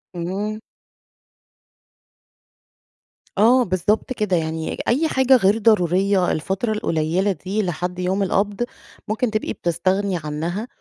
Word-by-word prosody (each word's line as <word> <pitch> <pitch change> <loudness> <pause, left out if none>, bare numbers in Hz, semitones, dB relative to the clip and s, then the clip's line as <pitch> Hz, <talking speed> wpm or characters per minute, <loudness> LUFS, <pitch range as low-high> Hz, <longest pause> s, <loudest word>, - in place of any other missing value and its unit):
إمم. 195 +5 -3 2.8
آه، 240 +5 +5
بالضبط 205 +6 0
كده، 210 -6 0
يعني 160 0 -3
أي 290 +7 +2
حاجة 265 -3 +4
غير 205 -3 +3
ضرورية 195 -3 +3
الفترة 190 +8 -2
القليّلة 180 -1 0
دي 190 +5 -2
لحد 180 0 -3
يوم 185 +2 0
القبض، 200 +3 0 0.4
ممكن 225 +2 -1
تبقي 215 0 -2
بتستغني 185 +2 -1
عنها، 165 +9 -3
195 Hz, 105 wpm, -21 LUFS, 175-215 Hz, 2.8 s, آه